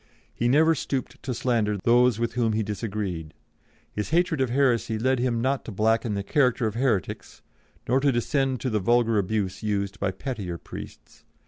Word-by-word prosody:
He 120 - 0
never 155 +6 +5
stooped 135 -3 -4
to 130 - -4
slander 115 -4 0
those 120 +3 +4
with 115 0 -1
whom 115 -2 +1
he 110 +1 0
disagreed. 100 -6 -4 0.6
His 105 - -4
hatred 170 -3 +2
of 130 - +1
heresy 120 -4 +1
led 130 +3 +1
him 120 -2 0
not 135 +1 0
to - - -6
blacken 110 +1 +1
the 100 - -2
character 125 0 +2
of 110 - -1
heretics, 115 -6 -2 0.4
nor 130 +3 +3
to 140 0 +3
descend 130 +1 0
to 130 - -1
the 105 - +1
vulgar 115 +1 +3
abuse 100 -1 -2
used 100 -2 -2
by 100 - 0
pettier 95 -3 -5
priests. - - -11
115 Hz, 180 wpm, -25 LUFS, 105-130 Hz, 0.6 s, never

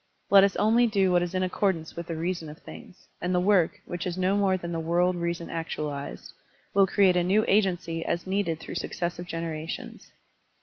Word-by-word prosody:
Let 195 -1 +8
us 200 -1 +2
only 230 +3 +4
do 195 -4 +2
what 175 0 +4
is 175 +1 -3
in 185 - +1
accordance 185 -3 -1
with 170 0 -6
the 165 - -3
reason 165 -1 -3
of 150 - -10
things, 210 -6 -13
and 180 +1 0
the - - +3
work, 185 -2 +2
which 175 +2 -4
is 180 0 -4
no 185 +2 +2
more 195 -2 +2
than 170 -1 -6
the 165 - -2
world 175 +3 +1
reason 170 -1 -3
actualized, 150 -4 -5 0.4
will 195 -1 +5
create 190 -1 +4
a 180 - +3
new 200 +5 +2
agency 180 -5 +1
as 170 - -2
needed 190 -4 -1
through - - -8
successive 175 0 -4
generations. 165 -1 -6
180 Hz, 200 wpm, -27 LUFS, 165-195 Hz, 0.4 s, Let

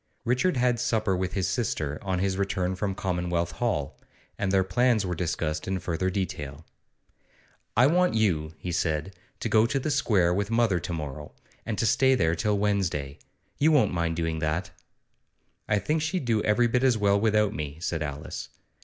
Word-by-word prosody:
Richard 130 +8 +1
had 125 -1 +2
supper 110 -5 +1
with 90 0 -2
his 95 -2 0
sister 80 - -2
on 95 -2 -1
his 95 +1 0
return 95 -1 -1
from 100 0 -2
Commonwealth 90 -2 -1
Hall, 75 - -2 0.4
and 100 - -1
their 95 -1 +4
plans 120 +1 +2
were 90 - -2
discussed 80 -2 -2
in 95 0 0
further 90 +1 -1
detail. 80 -6 -4 1.1
'I 120 - +7
want 180 +5 +3
you,' 80 -8 +1
he 90 - -5
said, 80 +1 -1 0.2
'to 115 - -2
go 110 +1 +5
to 135 - -1
the 150 +3 -2
Square 105 -11 +2
with 100 +2 -1
mother 115 -5 +2
to 85 - -6
morrow, 75 -2 -6 0.3
and 110 -3 -2
to - - +1
stay 130 +5 +4
there 80 -9 +2
till 105 +5 0
Wednesday. 95 -9 -1 0.4
You 155 +3 +4
won't 130 -11 +3
mind 85 -1 0
doing 80 -1 -1
that?' 80 +3 -1 1.0
'I 105 - +3
think 150 +11 0
she'd 155 -1 -1
do 115 -3 +2
every 105 +4 +3
bit 125 +2 +1
as 130 -4 +4
well 100 -1 +3
without 105 -1 +2
me,' 75 -1 -5
said 85 -2 -2
Alice. 75 +1 -5
95 Hz, 180 wpm, -27 LUFS, 85-115 Hz, 1.1 s, I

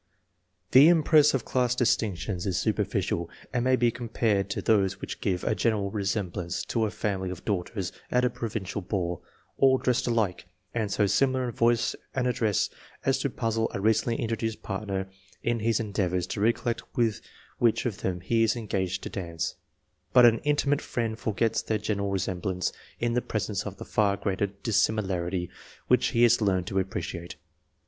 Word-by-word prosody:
The 135 +4 +9
impress 155 -3 +5
of 135 - -2
class 125 -1 +1
distinctions 105 -6 0
is 90 -3 0
superficial, 85 0 -1 0.2
and 120 -2 +1
may 130 0 +4
be 120 -2 +2
compared 110 -4 0
to - - -2
those 100 -3 +2
which - - -6
give 90 -3 -1
a 110 - +1
general 100 -1 0
resemblance 95 -4 -2
to 115 -1 +2
a - - -1
family 95 -3 -2
of 90 -1 -8
daughters 95 -1 -2 0.2
at 125 0 +2
a 125 - +1
provincial 105 -3 -4
ball, 90 -3 -2 0.4
all 135 -1 +6
dressed 125 0 0
alike, 110 -7 0 0.3
and 110 -4 -1
so 105 - +2
simUar 130 +4 +2
in - - -3
voice 115 0 +2 0.2
and 130 -1 +1
address 115 -5 +1 0.3
as 135 0 +2
to 140 - 0
puzzle 115 -2 -1
a - - -2
recently 110 +3 +2
introduced 115 -1 -2
partner 95 -1 -3 0.4
in 120 0 +1
his 110 0 +1
endeavours 95 -5 -1
to 100 - -4
recollect 115 +1 +1 0.2
with 115 -3 +1 0.4
which 115 0 +2
of 110 -6 -2
them 90 -1 -2
he 115 +5 +1
is 115 0 +3
engaged 95 -5 -2
to - - -4
dance; 85 -3 -3 0.6
but 125 -1 +8
an 115 -1 +5
intimate 145 -1 +1
friend 115 -2 -3
forgets 110 +1 0
their 110 - -1
general 100 -1 -2
resemblance 95 -1 -2 0.3
in 120 0 0
the 125 - +2
presence 105 -3 -2
of 100 -1 -7
the - - -8
far 100 -2 +1
greater 100 +1 -1
dissimilarity 95 -3 0 0.4
which - - +4
he 120 - +2
has 120 -1 +5
learned 95 -4 +1
to 95 +1 -1
appreciate. 95 -3 -4
110 Hz, 170 wpm, -27 LUFS, 95-120 Hz, 0.6 s, The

